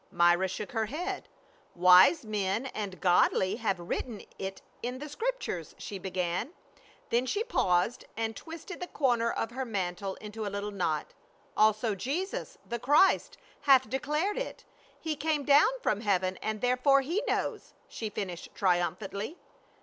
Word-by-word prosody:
Myra 175 +2 +4
shook 195 +3 -5
her 225 -2 0
head, 360 - -4 0.2
" - - -32
Wise 180 - +7
men 210 +2 -1
and 205 -7 -5
godly 185 +2 +3
have 200 -6 0
written 205 +6 -4 0.2
it 190 0 -4 0.2
in 245 +2 -3
the 295 +3 -6
Scriptures," 295 - -3
she 200 - -6
began, 180 - -2 0.6
then 245 +2 +2
she 415 - 0
paused 185 - +1
and 225 0 -2
twisted 335 +2 -8
the 360 - -4
corner 240 -7 +1
of 225 - -2
her 260 +2 -3
mantle 190 -4 -3
into 215 +1 -7
a 205 - -2
little 200 +1 -4
knot. 160 -6 -2 0.4
"Also 215 +1 +3
Jesus, 290 - -3
the 235 - -3
Christ, 295 +10 +4 0.3
hath 260 -4 +6
declared 300 - 0
it. - - -6 0.3
He 315 -2 -2
came 295 0 0
down 290 +5 +6
from 210 0 +1
heaven 185 -3 +1
and 215 -1 -3
therefore 255 +3 +4
he 335 +10 -1
knows," - - -2
she 220 - -5
finished 185 -4 -5
triumphantly. 190 - 0
220 Hz, 150 wpm, -30 LUFS, 190-280 Hz, 0.6 s, Wise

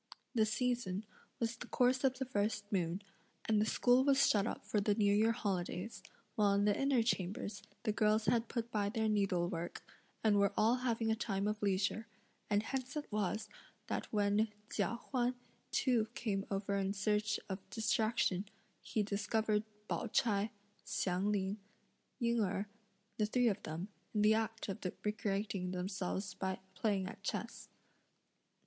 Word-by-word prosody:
The 220 -3 +3
season 220 -4 0 0.3
was 230 0 0
the 240 - -8
course 255 +2 +3
of 260 -1 +3
the 265 - -2
first 210 -3 0
moon, 180 0 0 0.4
and 215 -2 +3
the 215 - +2
school 245 +3 +4
was 275 0 +5
shut 205 0 +3
up - - -4
for 210 - +1
the 205 0 +2
new 205 -2 +4
year 220 +2 +4
holidays; 195 -1 -2 0.3
while 205 -2 +3
in 200 0 +3
the 205 -1 +4
inner 275 -4 +3
chambers 200 -1 -1 0.2
the 220 - +2
girls 215 0 +3
had 235 -1 +2
put 235 0 -3
by 205 -2 +1
their 220 +1 0
needlework, 180 -5 0 0.4
and 210 -2 +5
were 200 -1 +3
all 230 +4 +4
having 230 -3 0
a - - +3
time 200 -3 -1
of 210 0 -2
leisure, 200 +2 +1 0.4
and 205 0 +3
hence 265 +3 -3
it 300 -4 -4
was 210 +1 -1 0.4
that - - -3
when 205 +1 +3 0.3
Chia 210 +2 +1 0.2
Huan 250 -1 +1 0.3
too 240 -5 +2
came 200 -4 -1
over 200 0 -1
in 195 0 0
search 210 +1 +1
of 190 0 -3
distraction, 220 -3 +1 0.4
he 215 - 0
discovered 210 +1 +1 0.2
Pao - - -1
ch'ai, 210 -3 +2 0.3
Hsiang 190 0 0
Ling, 200 0 0 0.6
Ying 235 -1 +1
Erh, 195 0 0 0.5
the 210 - +3
three 245 +2 +3
of 205 -1 -2
them, 160 +4 -4 0.3
in 210 - +3
the 215 +1 +6
act 225 0 -1
of 195 - -4 0.2
recreating 200 -3 -1
themselves 185 +1 -2
by 190 -1 -2 0.2
playing 195 0 0
at 185 - -8
chess. - - -4
210 Hz, 160 wpm, -36 LUFS, 200-225 Hz, 0.6 s, the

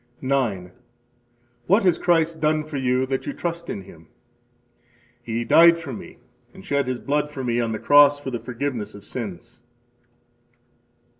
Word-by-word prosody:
9. 120 -10 -1 1.0
What 200 +4 +4
has 180 -3 +2
Christ 165 -2 +1
done 155 0 +1
for 150 -1 -6
you 130 0 +1
that 135 0 -3
you 285 - -3
trust 170 -6 -5
in 95 - -5
Him? 80 -4 -16 1.1
He 115 0 -3
died 170 +6 +6
for 160 -6 -7
me - - -10 0.4
and - - -13
shed 140 -2 0
His 130 -1 -2
blood 145 +4 -1
for 140 -3 -6
me 120 -1 0
on 115 -1 -1
the 110 - -2
cross 145 +3 +5
for 135 -2 -6
the 120 - -3
forgiveness 120 -2 -4
of 100 0 -13
sins. 110 -1 -7
135 Hz, 160 wpm, -23 LUFS, 115-155 Hz, 1.1 s, died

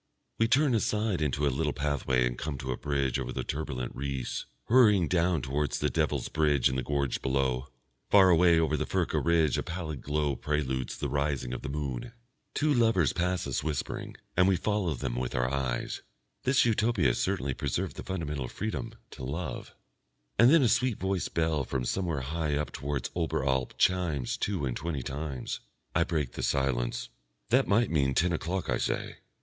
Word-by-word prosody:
We 115 - +4
turn 135 +3 +3
aside 105 -4 +1
into 75 0 0
a 70 - +2
little 75 +2 0
pathway 70 -3 +1
and - - -1
come 75 +2 -4
to 65 -1 -4
a - - -1
bridge 70 -1 -1
over 65 -1 -3
the - - -3
turbulent 70 -5 -3
Reuss, 70 -2 -3 0.2
hurrying 105 -8 +5
down 85 -4 +1
towards 70 +2 -1
the - - 0
Devil's - - 0
Bridge 75 -4 +2
in 65 - -3
the 65 - 0
gorge 70 -1 -1
below. 65 -1 0 0.4
Far 95 -2 +7
away 85 0 +5
over 80 -1 +2
the - - -2
Furka - - 0
ridge 80 -4 +3
a - - 0
pallid 80 -5 -5
glow 75 -1 0
preludes 65 -2 -2
the - - -2
rising 70 -3 -1
of 65 - -4
the - - -5
moon. 70 - -4 0.4
Two 150 0 +2
lovers 115 - +3
pass 90 0 0
us - - -2
whispering, 75 -2 -3 0.2
and 90 +1 +5
we 95 - +4
follow 100 -5 0
them - - -3
with 65 0 -2
our 60 0 +1
eyes. 65 -3 -2 0.4
This 130 0 +4
Utopia 110 - +2
has - - -1
certainly 65 +1 0
preserved - - -2
the - - -6
fundamental 75 -8 -3
freedom, 110 - -4 0.2
to - - -9
love. 80 +7 -5 0.6
And 120 +2 +8
then 160 -1 +6
a - - +5
sweet 115 0 +2
voiced 95 -1 -2
bell 80 -3 +1
from 65 -1 -2
somewhere 85 -1 -1
high 75 +2 -1
up 75 +1 -2
towards 70 -3 -3
Oberalp 65 -6 0
chimes 85 -8 +1
two 95 -8 -1
and 60 -2 -2
twenty 80 -6 -3
times. 70 -1 -4 0.3
I - - +3
break 75 -7 -1
the - - -6
silence. 65 -3 0 0.4
"That 130 +3 +4
might 115 +4 +3
mean 70 -5 +2
ten 90 +1 +3
o'clock," 90 +3 -2
I - - 0
say. - - -2
75 Hz, 185 wpm, -29 LUFS, 65-90 Hz, 0.6 s, And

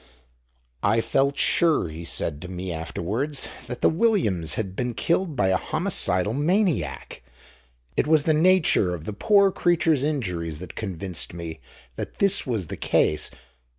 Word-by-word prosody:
"I 105 +3 +2
felt 135 +4 +1
sure," 165 - +3
he 80 +2 -8
said 80 -2 -2
to 90 - -7
me 90 0 -5
afterwards, 105 - -3 0.2
"that 125 - -6
the - - +6
Williams's 160 - +1
had 95 -4 -4
been 125 0 -2
killed 170 +1 0
by 100 -6 +2
a 95 - +3
homicidal 95 +3 +1
maniac. 155 - -1 0.7
It - - +1
was 155 -2 +4
the 160 - +2
nature 155 - +3
of 80 -2 -10
the 105 - -4
poor 200 - +4
creatures' 160 -6 +2
injuries 90 - -2
that 90 +1 -9
convinced 95 -4 -4
me 80 -2 -7 0.4
that - - -6
this 200 -5 +2
was 110 -7 -1
the - - -7
case. 75 - +1
110 Hz, 150 wpm, -24 LUFS, -, 0.7 s, the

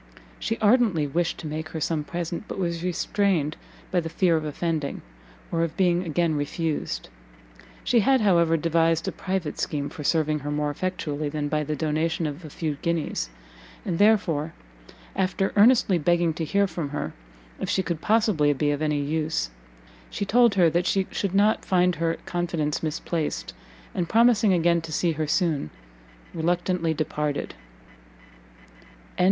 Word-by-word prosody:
She - - -2
ardently 210 - +4
wished 165 +4 -1
to 160 - -6
make 155 +1 -4
her 160 - -5
some 155 0 -1
present, 170 +3 -4
but - - -6
was 170 -2 -2
restrained 180 -3 0 0.4
by 180 - +3
the 165 -1 -4
fear 175 0 +2
of 160 - 0
offending, 155 -1 -2 0.5
or 165 - 0
of 165 -1 -2
being 180 -2 +3
again 170 -1 0
refused; 150 - -2 0.7
she 240 - +3
had, 260 +4 +3
however, 170 -5 +4
devised 165 0 +1
a - - 0
private 185 -5 -3
scheme 145 -1 -2
for 150 - -8
serving 155 0 +1
her 145 +1 -5
more 150 0 0
effectually 150 -3 -3
than 145 0 -3
by 150 0 0
the 150 +1 -2
donation 160 +2 -1
of 150 +3 -5
a 155 - -8
few 150 -1 -3
guineas, 160 - -1 0.6
and 165 - -2
therefore, 190 -8 +3 0.6
after 190 0 0
earnestly 210 -4 +5
begging 170 +1 +2
to 165 0 -3
hear 200 +6 +2
from 165 -5 -4
her 145 - -4 0.5
if - - -3
she 190 - +1
could 170 -3 -3
possibly 205 -10 +3
be 145 +1 0
of 145 +1 -2
any 150 -1 +1
use, 150 - -1 0.6
she 200 - -3
told 235 0 +4
her 180 -3 +5
that 175 +2 +1
she 195 -1 +2
should 195 -2 -2
not 210 +3 +3
find 180 -2 +2
her 165 0 0
confidence 170 -4 -1
misplaced, 160 0 -3 0.4
and 180 -6 -2
promising 230 -2 +4
again 170 -1 +3
to 165 -1 -8
see 170 +2 +1
her 155 -1 -2
soon, 155 - 0 0.6
reluctantly 175 0 0
departed. 150 -2 -2
165 Hz, 160 wpm, -25 LUFS, 150-185 Hz, 0.7 s, earnestly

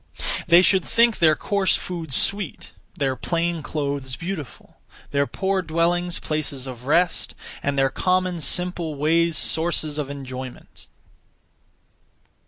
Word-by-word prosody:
They 175 +1 +7
should 190 -1 +4
think 235 -1 +3
their 160 -3 +6
(coarse) 200 +2 +1
food 170 -5 -5
sweet; 200 +9 -1 0.3
their 135 -4 0
(plain) 170 +4 -1
clothes 140 -4 -3
beautiful; 165 -5 -7 0.3
their 140 0 +2
(poor) 190 -1 0
dwellings 175 +1 0
places 145 -4 -3
of 125 -1 -8
rest; 170 +3 +1 0.3
and 140 0 -1
their 135 0 +3
common 185 -2 0
(simple) 175 0 0
ways 165 +3 +2
sources 160 -2 0
of 145 -2 -3
enjoyment. 130 -2 -8
160 Hz, 120 wpm, -23 LUFS, 140-180 Hz, 0.3 s, They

